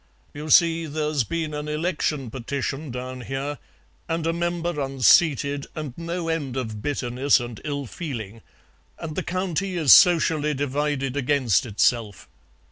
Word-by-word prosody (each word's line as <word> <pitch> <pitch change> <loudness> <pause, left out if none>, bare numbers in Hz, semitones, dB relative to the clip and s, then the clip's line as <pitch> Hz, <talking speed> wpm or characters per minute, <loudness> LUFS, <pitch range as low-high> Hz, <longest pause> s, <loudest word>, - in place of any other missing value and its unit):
"You 150 +2 -7
see, 165 +1 +4
there's 150 -2 -1
been 160 +5 -3
an 150 0 -4
election 150 -5 -2
petition 135 +4 -4
down 125 +1 -6
here, 135 +3 -4 0.5
and 165 0 -1
a 165 - +1
member 170 -2 -2
unseated 140 +1 +3
and 155 -5 -5
no 170 0 -4
end 145 -6 -2
of 110 -5 -4
bitterness 135 +1 +1
and 120 -2 -7
ill 145 -2 -3
feeling, 115 - -6 0.6
and 155 -2 -6
the - - -1
County 185 0 -2
is 155 -6 +7
socially 160 -5 +5
divided 140 -1 -1
against 130 -6 +1
itself. 110 -1 0
145 Hz, 135 wpm, -24 LUFS, 130-165 Hz, 0.6 s, is